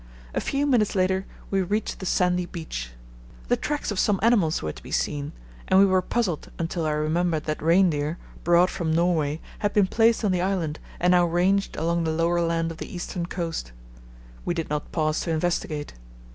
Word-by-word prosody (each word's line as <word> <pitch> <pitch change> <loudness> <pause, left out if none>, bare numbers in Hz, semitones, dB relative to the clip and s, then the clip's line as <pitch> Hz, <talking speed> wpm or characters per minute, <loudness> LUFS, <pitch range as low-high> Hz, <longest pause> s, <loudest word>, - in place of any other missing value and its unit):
A - - 0
few 280 +1 0
minutes 240 -8 +2
later 190 0 +1 0.2
we 195 -1 +2
reached 205 +4 -2
the 190 - -4
sandy 180 -1 +1
beach. - - -6 0.6
The - - +4
tracks 295 -6 -2
of 200 - -2
some 205 -3 +2
animals 205 -9 +3
were 75 - -2
to - - -12
be - - -11
seen, 140 - -1 0.4
and 190 - +4
we 200 - +8
were 185 -1 +3
puzzled 190 -6 -1
until 165 -1 -2
I - - +1
remembered 155 +1 0
that 155 -1 -3
reindeer, 165 -2 +2 0.3
brought 175 +1 +4
from 160 -3 -1
Norway, 160 -3 +1 0.2
had 205 -1 0
been 205 -2 +5
placed 225 +3 +3
on 200 - +2
the 180 -1 +1
island 180 -5 -1 0.2
and 180 +1 +3
now 175 -1 +5
ranged 185 +4 +1
along 170 +2 0
the 160 - 0
lower 170 +2 +1
land 165 0 0
of 165 - -9
the - - -7
eastern 175 -1 -4
coast. 165 - -4 0.7
We 175 - -1
did 165 -3 -3
not 150 0 -3
pause 155 -1 0
to - - -3
investigate. 155 -2 -1
175 Hz, 195 wpm, -25 LUFS, 160-190 Hz, 0.7 s, we